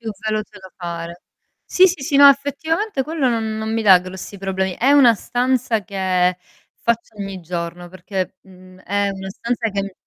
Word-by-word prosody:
Più 225 Hz, -2 st, -5 dB, 0.2 s
veloce 215 Hz, -1 st, -3 dB
da 190 Hz, -1 st, -13 dB
fare 170 Hz, -1 st, -6 dB, 0.4 s
Sì, 375 Hz, +1 st, +5 dB
sì, 335 Hz, -6 st, -4 dB
sì, 285 Hz, -, -3 dB
no 280 Hz, 0 st, +9 dB
effettivamente 285 Hz, -, 0 dB
quello 300 Hz, -2 st, -1 dB
non 220 Hz, -2 st, -1 dB
non 220 Hz, 0 st, -3 dB
mi 225 Hz, 0 st, 0 dB
dà 190 Hz, -3 st, +7 dB
grossi 185 Hz, +2 st, -9 dB
problemi. 190 Hz, -1 st, -2 dB
È 270 Hz, +4 st, +4 dB
una 250 Hz, -5 st, +6 dB
stanza 245 Hz, -1 st, 0 dB
che, 185 Hz, -1 st, 0 dB, 0.4 s
faccio 235 Hz, -2 st, -1 dB
ogni 195 Hz, -2 st, -6 dB
giorno, 175 Hz, +1 st, -5 dB
perché, 185 Hz, 0 st, -5 dB
mhmm, 185 Hz, -1 st, -17 dB
è 200 Hz, +2 st, -1 dB
una 190 Hz, 0 st, -7 dB
stanza 235 Hz, +3 st, -2 dB
che 200 Hz, -1 st, -3 dB
200 Hz, 175 wpm, -20 LUFS, 185-245 Hz, 0.4 s, no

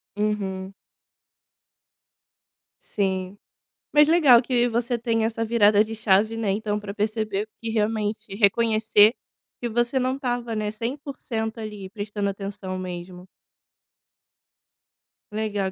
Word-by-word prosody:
Uhum. 195 Hz, -2 st, -2 dB, 2.1 s
Sim. 190 Hz, -1 st, -2 dB, 0.5 s
Mas 295 Hz, 0 st, +6 dB
legal 295 Hz, -8 st, +6 dB
que 245 Hz, -1 st, +1 dB
você 235 Hz, +1 st, -1 dB
tenha 225 Hz, -1 st, 0 dB
essa 225 Hz, 0 st, -1 dB
virada 210 Hz, -2 st, +4 dB
de 220 Hz, +1 st, -7 dB
chave, 220 Hz, +1 st, +2 dB
né, 215 Hz, -3 st, 0 dB
então 210 Hz, +1 st, -1 dB
para 205 Hz, -1 st, -7 dB
perceber 215 Hz, -1 st, -2 dB
e 230 Hz, -, -3 dB
realmente 215 Hz, -1 st, -1 dB
reconhecer 220 Hz, 0 st, +4 dB, 0.5 s
que 240 Hz, -, -2 dB
você 240 Hz, +3 st, +1 dB
não 255 Hz, +1 st, 0 dB
estava, 245 Hz, -4 st, -3 dB
né, 210 Hz, -1 st, -2 dB
100% 230 Hz, -2 st, -4 dB
ali, 210 Hz, -3 st, -7 dB
prestando 205 Hz, 0 st, -3 dB
atenção 195 Hz, -1 st, -5 dB
mesmo. 180 Hz, 0 st, -7 dB, 2.0 s
Legal 205 Hz, -3 st, -2 dB
215 Hz, 110 wpm, -24 LUFS, 200-230 Hz, 2.1 s, Mas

